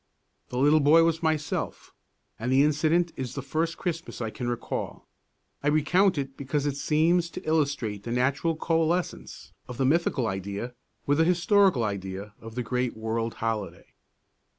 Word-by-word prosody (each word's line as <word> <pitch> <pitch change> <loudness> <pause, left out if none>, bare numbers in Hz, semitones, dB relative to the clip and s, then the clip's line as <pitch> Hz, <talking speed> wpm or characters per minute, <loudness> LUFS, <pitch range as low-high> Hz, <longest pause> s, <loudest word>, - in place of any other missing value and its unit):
The 125 - -5
little 145 +4 +5
boy 155 +3 +6
was 165 -1 +1
myself, 155 -2 -2 0.5
and 120 +3 -2
the 135 +2 +5
incident 155 +3 +2
is 130 -3 -5
the 140 - -4
first 160 +4 -1
Christmas 170 -2 -4
that 120 - -3
I - - -3
can 125 - -5
recall. 120 - -4 0.5
I 145 - -2
recount 160 +5 +3
it 135 -1 -3
because 140 +1 -2
it 145 -2 -1
seems 165 +4 +2
to - - -9
illustrate 140 -10 0
the 115 - -6
natural 140 +6 +1
coalescence 165 +2 -1
of 125 - -7
the 135 - +1
mythical 145 -3 +2
idea 100 +4 -4 0.3
with 145 +2 +2
the - - +6
historical 180 - +3
idea 100 0 -4
of 115 0 -10
the 125 - -2
great 125 +1 -2
world 115 +1 -2
holiday. 105 -6 -4
140 Hz, 165 wpm, -27 LUFS, 115-160 Hz, 0.5 s, boy